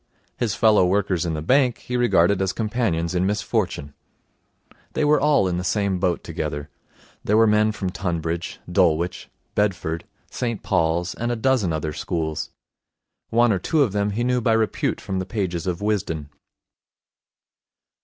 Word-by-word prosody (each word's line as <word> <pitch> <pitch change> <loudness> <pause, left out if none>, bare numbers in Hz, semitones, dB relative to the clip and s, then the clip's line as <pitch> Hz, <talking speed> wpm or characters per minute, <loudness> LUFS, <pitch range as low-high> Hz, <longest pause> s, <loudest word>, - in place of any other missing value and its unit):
His 110 -6 -1
fellow 105 +1 +5
workers 95 -1 +1
in 80 - -1
the 75 - -4
bank 125 - +3
he 125 - -6
regarded 100 -6 +3
as 95 -1 0
companions 105 -7 -1
in 90 0 +1
misfortune. 100 -8 -1 1.0
They 155 - +1
were 150 0 +4
all 145 -9 +3
in 90 -1 -1
the - - -3
same 100 0 0
boat 90 -1 0
together. 75 0 -4 0.5
There 105 - +2
were 115 - +6
men 105 0 +3
from 95 -3 -3
Tonbridge, 85 -2 -3
Dulwich, 85 +3 +1 0.2
Bedford, 90 -5 -1 0.3
St 115 -4 -3
Paul's, 85 +2 +1
and 120 +1 -2
a - - 0
dozen 115 -6 +1
other 80 -1 -2
schools. 80 0 -3 0.8
One 120 0 +4
or 95 - 0
two 155 - +2
of 120 - 0
them 100 +1 0
he 110 +4 -1
knew 125 0 +1
by 115 0 +2
repute 110 -1 0
from 95 -1 -3
the 95 - -3
pages 95 -4 -2
of 90 0 -2
Wisden. 90 -8 -1
95 Hz, 160 wpm, -23 LUFS, 85-110 Hz, 1.0 s, were